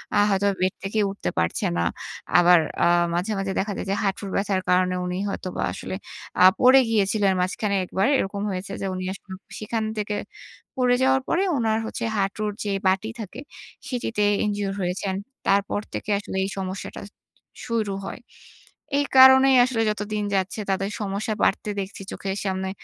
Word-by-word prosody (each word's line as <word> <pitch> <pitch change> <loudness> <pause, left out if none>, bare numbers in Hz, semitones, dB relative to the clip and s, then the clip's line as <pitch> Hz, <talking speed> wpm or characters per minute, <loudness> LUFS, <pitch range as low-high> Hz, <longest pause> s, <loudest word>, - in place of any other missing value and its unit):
আ - - +4
হয়তো 200 0 +2
বেড 185 0 +2
থেকে 200 +3 -1
উঠতে 195 - -3
পারছে 85 0 0
না। 85 - +1 0.5
আবার 175 0 +7 0.2
আ - - +5 0.3
মাঝে, 180 +5 -1
মাঝে 195 0 -2
দেখা 205 +2 -1
যায় - - -4
যে, 195 - +1
হাঁটুর 195 0 -2
ব্যথার 195 -1 0
কারণে, 180 0 +3
উনি 180 0 -3
হয়তোবা 185 -2 -4
আসলে - - -6 0.5
আ - - +8 0.2
পড়ে 260 +1 +7
গিয়েছিলেন 205 -2 +2
মাঝখানে 200 +3 -1
১ 180 - -9
বার। 195 - +4
এরকম 200 -2 -2
হয়েছে 185 +1 -5
যে, - - -2
উনি 185 0 -4
আসলে 195 - -13 0.3
সেখান 220 +1 -2
থেকে 210 0 -2 0.6
পড়ে 250 -1 +3
যাওয়ার 265 0 +3
পরে 355 +3 +1
উনার 220 -2 +1
হচ্ছে 225 - -5
হাঁটুর 205 +2 -1
যে 205 - -2 0.2
বাটি 190 +3 +1
থাকে 215 +3 -7 0.5
সেটিতে 240 -5 -2 0.2
injure 205 -1 -2
হয়েছেন। 185 +2 -2 0.3
তারপর 200 +1 +2
থেকে - - -5
আসলে 195 -1 -6
এই 190 - -2
সমস্যাটা 190 0 -5 0.6
শুরু 225 -4 -1
হয়। - - -6 0.8
এই 285 - +2
কারণেই 265 0 +8
আসলে 245 -3 -1
যতদিন 210 0 -2
যাচ্ছে, 190 +3 -1
তাদের 195 +1 0
সমস্যা 205 +2 -2
বাড়তে 205 - +1
দেখছি 195 0 -6
চোখের 195 0 -4
সামনে। 190 0 -2
200 Hz, 165 wpm, -24 LUFS, 190-220 Hz, 0.8 s, আ